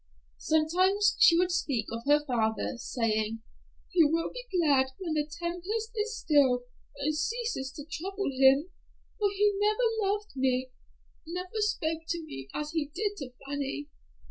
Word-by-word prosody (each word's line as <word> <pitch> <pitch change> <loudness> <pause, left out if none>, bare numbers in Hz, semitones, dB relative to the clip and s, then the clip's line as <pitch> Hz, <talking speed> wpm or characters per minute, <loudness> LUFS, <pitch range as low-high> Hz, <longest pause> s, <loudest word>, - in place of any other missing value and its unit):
Sometimes 370 +6 +3
she 350 -8 +7
would 360 +1 +2
speak 275 -10 0
of 230 +1 -5
her 295 +1 +4
father, 225 -4 0
saying, 225 -2 -1 0.5
"He 350 -3 +5
will 325 +2 +1
be - - -8
glad 280 -6 +4
when 345 -4 -3
the 300 -1 0
tempest 360 +8 -3
is 445 +1 -2
still 265 -5 +3 0.3
and 295 +2 0
ceases 450 - -2
to 290 -1 -8
trouble 385 +2 -3
him, 270 +6 +4 0.5
for 410 -1 +3
he 410 +1 +2
never 430 -1 +2
loved 415 -3 -4
me, 260 -1 0 0.6
never 365 +5 -4
spoke 325 -7 0
to 340 -1 -2
me 135 - -8
as 300 0 -4
he 320 -3 -1
did 405 +7 -2
to 275 -5 -6 0.2
Fanny. 285 +1 -3
320 Hz, 150 wpm, -29 LUFS, 275-400 Hz, 0.6 s, she